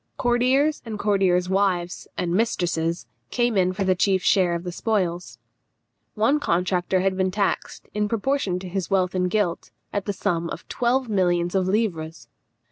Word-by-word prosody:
Courtiers 255 +5 +2
and 225 -3 -5
courtiers' 190 -4 +2
wives 185 -2 0
and 175 -1 -1
mistresses 175 -5 0 0.2
came 240 -2 +1
in 185 -1 +3
for 195 +2 -2
the 190 -1 +3
chief 190 0 +1
share 180 -3 +3
of 170 - -4
the 180 - -4
spoils. 175 - -2 0.8
One 230 +8 +2
contractor 180 -3 0
had 190 0 +1
been 190 0 +1
taxed, 200 +1 -2
in 210 0 0
proportion 230 -4 0
to 190 - -7
his 185 -1 -3
wealth 185 -2 +1
and 180 -1 0
guilt, 190 -4 -1 0.2
at 200 -2 -2
the 205 - -2
sum 170 -2 -1
of - - -8
twelve 250 +1 0
millions 175 -4 +1
of 190 -1 +1
livres. 175 -6 -2
190 Hz, 165 wpm, -24 LUFS, 180-215 Hz, 0.8 s, in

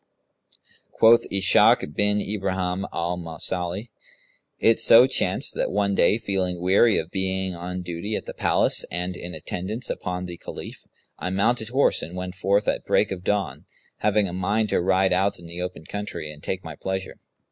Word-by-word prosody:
Quoth 115 +1 +5
Ishak 95 -6 +4
bin 105 +2 +2
Ibrahim 95 -2 -2
al 85 +1 -2
Mausili, 90 +5 -4 0.7
"It 115 0 +3
so 115 +2 +8
chanced 130 - 0
that, - - -1
one 100 -1 +1
day 105 - +3
feeling 95 -5 -2
weary 100 +5 +4
of - - -3
being 95 -1 -1
on 90 +1 -5
duty 90 +5 -4
at - - -4
the - - -7
Palace - - +2
and 90 +1 -3
in 90 0 -7
attendance 105 +8 -4
upon 90 0 -4
the 90 -1 -7
Caliph, - - -9 0.3
I 90 - -3
mounted 110 +4 +1
horse 135 +3 +2
and 85 - -7
went 90 0 -5
forth, 100 +2 +1
at - - 0
break - - +2
of 90 -2 -5
dawn, 105 0 -1 0.3
having 105 -1 +2
a 85 - -6
mind 100 +4 0
to - - +1
ride 95 +1 +2
out 95 +2 +1
in 85 - -14
the 85 +1 -7
open 90 -3 -6
country 100 -6 -5
and 75 -1 -13
take 95 +3 -4
my 80 -2 -8
pleasure. 95 +2 -5
95 Hz, 175 wpm, -24 LUFS, 90-105 Hz, 0.7 s, so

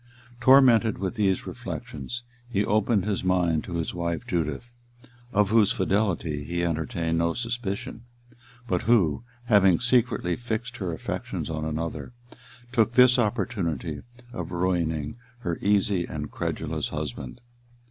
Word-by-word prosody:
Tormented 120 -3 +6
with 95 -1 -2
these 100 -5 +1
reflections, 120 - -6 0.3
he 105 -4 +1
opened 105 -2 +2
his 105 -3 -1
mind 90 -4 +2
to 90 - -5
his 85 -1 -2
wife 85 -2 -2
Judith, 85 - -2 0.6
of 105 -1 +2
whose 110 -3 +5
fidelity 95 -7 0
he 85 +3 -2
entertained 80 0 -1
no 85 0 +1
suspicion, 115 -1 -4 0.6
but 90 -5 0
who, 100 -6 +3 0.2
having 95 -6 +5
secretly 125 -8 +2
fixed 120 +1 -4
her 95 -4 -3
affections 80 - -4
on 80 -1 -3
another, 80 +8 -4 0.6
took 115 -1 +2
this 125 +1 +6
opportunity 105 - -1 0.3
of - - -5
ruining 85 -1 -1 0.2
her 85 -5 -2
easy 100 -3 +2
and 75 -1 -5
credulous - - -3
husband. 75 - -5
95 Hz, 125 wpm, -26 LUFS, 85-115 Hz, 0.6 s, Tormented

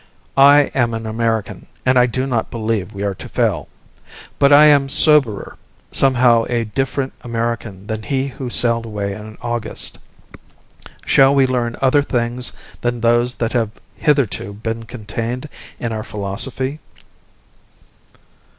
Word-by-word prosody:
I 140 +1 +6
am 120 -3 +1
an 115 0 -5
American, 115 -1 -2 0.2
and 130 0 +3
I 125 - +5
do 130 +2 -2
not 120 -5 -1
believe 110 -4 -2
we 100 0 -6
are 100 -1 -1
to - - -10
fail. - - -1 0.7
But 140 0 +5
I 145 +1 +8
am 140 -2 +5
soberer, 140 -8 +3 0.3
somehow 120 -4 +3
a 120 -1 0
different 135 +4 -2
American 115 -4 -4
than 110 0 -4
he 135 +2 -1
who 130 -1 -6
sailed 115 -1 +1
away 100 -2 -3
in 110 +1 -10
August. 120 -1 -2 1.1
Shall 135 0 +5
we 135 -1 +5
learn 120 -2 -1
other 135 +2 +4
things 125 -2 -2 0.3
than 120 0 -1
those 120 +2 +2
that 115 -1 -2
have 115 -3 +1 0.3
hitherto 135 -9 0
been 115 +2 -5
contained 115 +3 -5 0.3
in 115 - -3
our 110 -1 -3
philosophy? 130 +9 -3
120 Hz, 140 wpm, -19 LUFS, 110-130 Hz, 1.1 s, I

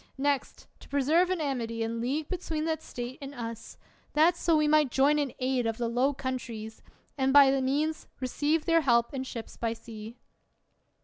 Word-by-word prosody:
Next, 280 0 -1
to - - -16
preserve 300 +6 +3
an 370 -2 0
amity 235 -6 -2
and 230 +1 -3
league 285 +5 -1
between 325 -4 -3
that 320 -1 -1
State 245 0 -7
and 280 0 -7
us; 230 -2 -7 0.4
that 320 +4 +5
so 335 -2 +2
we 305 0 +3
might 300 -2 +4
join 280 +4 +3
in 285 -3 -1
aid 255 -2 0
of 225 -1 -2
the 235 - -1
Low 250 +4 +2
Countries, 240 -5 -5 0.4
and 265 0 +2
by 280 -1 +8
that 270 0 +1
means 295 +4 -1
receive 290 +5 0
their 330 -1 +4
help 235 -4 +2
and 260 -1 -4
ships 230 -3 -7
by 230 -1 -1
sea. 225 0 -10
270 Hz, 185 wpm, -29 LUFS, 235-300 Hz, 0.4 s, by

